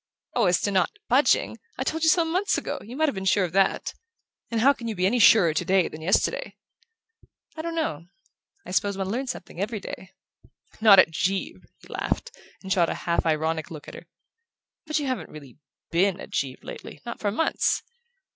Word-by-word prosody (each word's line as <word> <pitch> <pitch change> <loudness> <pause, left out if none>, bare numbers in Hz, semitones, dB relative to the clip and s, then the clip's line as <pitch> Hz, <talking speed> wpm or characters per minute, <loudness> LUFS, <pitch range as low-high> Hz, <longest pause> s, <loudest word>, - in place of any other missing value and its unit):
"Oh, 235 -5 +2
as 180 0 +3
to 205 - 0
not 190 - +1
budging - - +3 0.2
I - - -1
told 320 +1 -2
you 320 - +4
so 335 +1 +4
months 365 +5 0
ago: - - -4
you 235 +4 -10
might 315 0 +3
have 280 - 0
been 190 -2 -5
sure 190 +1 +3
of 175 - -2
that! 195 +2 +1 0.6
And 230 - -1
how 275 +5 +5
can 235 -4 -8
you 220 - -3
be 180 0 0
any 235 +6 +2
surer 200 -7 +6
today 180 +2 +2
than 155 - -9
yesterday?" 180 +5 0 1.0
"I 315 - -4
don't 335 +1 -4
know. 170 - -2 0.6
I - - -8
suppose 200 +1 0
one 190 -1 -2
learns 255 +4 -2
something 190 -7 -6
every 215 +1 -2
day 190 -1 -9 0.3
" - - -28
"Not 210 -3 +8
at 185 - +6
Givre!" 185 +4 -2
he - - -16
laughed, - - -3 0.3
and 190 0 0
shot 175 -4 +2
a - - -2
half 170 -1 +1
ironic 160 0 0
look 155 -3 -10
at - - -9
her. - - -11 0.8
"But 310 - 0
you 295 - -1
haven't 260 -2 -3
really 145 -3 -13 0.3
BEEN 185 +2 +2
at - - -10
Givre 135 -2 -3
lately - - -9
not 235 - -6
for 205 - 0
months! 320 +11 0
195 Hz, 205 wpm, -25 LUFS, 175-250 Hz, 1.0 s, Not